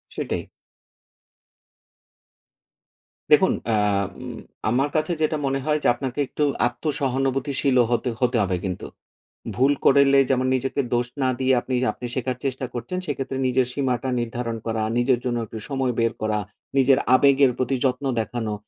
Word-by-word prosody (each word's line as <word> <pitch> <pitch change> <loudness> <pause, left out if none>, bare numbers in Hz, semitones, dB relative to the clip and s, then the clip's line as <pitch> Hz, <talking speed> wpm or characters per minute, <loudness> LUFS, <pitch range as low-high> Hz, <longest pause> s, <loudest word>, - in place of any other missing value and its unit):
সেটাই। - - -3 2.9
দেখুন - - +6 0.2
আ - - +3 0.4
উম 125 -2 -7 0.3
আমার 135 +5 +1
কাছে 155 +3 +1
যেটা 155 0 +1
মনে 135 0 0
হয় 150 -1 +2
যে, - - +3
আপনাকে 130 +2 -5
একটু 150 - -2 0.2
আত্মসহানুভূতিশীলও 135 -1 0
হতে, 125 +1 +1
হতে 125 -1 +2
হবে 95 -1 0
কিন্তু। 90 -2 -4 0.7
ভুল 135 +3 +3
করলে 140 0 +6
যেমন 130 -1 +2
নিজেকে 135 +2 -1
দোষ 120 0 +1
না 130 - +2
দিয়ে 130 0 +3
আপনি, 130 - -3 0.2
আপনি - - -9
শেখার 130 -1 -2
চেষ্টা 130 0 -2
করছেন। 120 +10 -4
সেক্ষেত্রে, 135 -3 -3
নিজের 130 0 +2
সীমাটা 130 -2 -1
নির্ধারণ 115 0 -3
করা, 115 -1 -1 0.2
নিজের 120 0 +2
জন্য 120 -1 0
একটু 110 - -8
সময় 135 -2 0
বের 115 0 +2
করা, 110 -1 0 0.4
নিজের 135 0 +5 0.2
আবেগের 140 0 +5
প্রতি 130 +1 0
যত্ন 130 +2 0
দেখানো, 110 -1 -3
130 Hz, 145 wpm, -23 LUFS, 120-135 Hz, 2.9 s, দেখুন